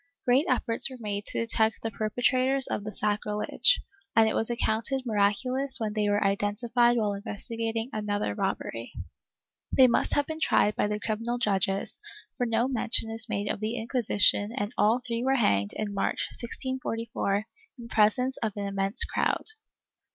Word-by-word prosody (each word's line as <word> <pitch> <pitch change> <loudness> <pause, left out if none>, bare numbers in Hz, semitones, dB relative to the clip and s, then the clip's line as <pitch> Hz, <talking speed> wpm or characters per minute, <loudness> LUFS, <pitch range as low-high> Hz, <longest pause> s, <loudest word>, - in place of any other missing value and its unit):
Great 255 +5 +3
efforts 235 -1 +2
were 260 - -9
made 205 -2 -4
to - - -2
detect 225 -1 0
the 225 - -2
per 215 +1 -2
petrators 255 +3 +2
of 205 - -2
the 215 - -5
sacrilege, 210 - +2 0.4
and 225 -1 +6
it 220 - 0
was 225 - +2
accounted 240 +3 -1
miraculous 250 +6 +1
when 215 -2 -2
they 210 -1 0
were 205 0 +2
identified 230 +5 +2
while 210 -3 +1
investigating 225 +3 -3
another 205 - -1
robbery. 115 +3 -3 0.8
They 260 - +6
must 235 - +2
have 290 - +2
been 315 +1 -6
tried 210 -8 +2
by - - +1
the 210 0 -2
criminal 230 +3 -2
judges, 195 -4 -1 0.4
for 245 -3 -1
no 230 +2 +1
mention 230 -3 0
is 225 0 -5
made 205 -1 -2
of - - -2
the 220 +2 -2
Inquisition 220 -3 +2
and 205 +3 -2
all 220 +4 +3
three 235 -1 -2
were 265 +1 +2
hanged 100 - +1
in 210 -1 -4
March, 195 - -1
1G44, 230 -5 -3 0.3
in 235 -1 -9
presence 245 +4 +2
of 220 -3 -2
an 200 - -3
immense 195 0 +2
crowd. - - -1
225 Hz, 165 wpm, -27 LUFS, 205-240 Hz, 0.8 s, and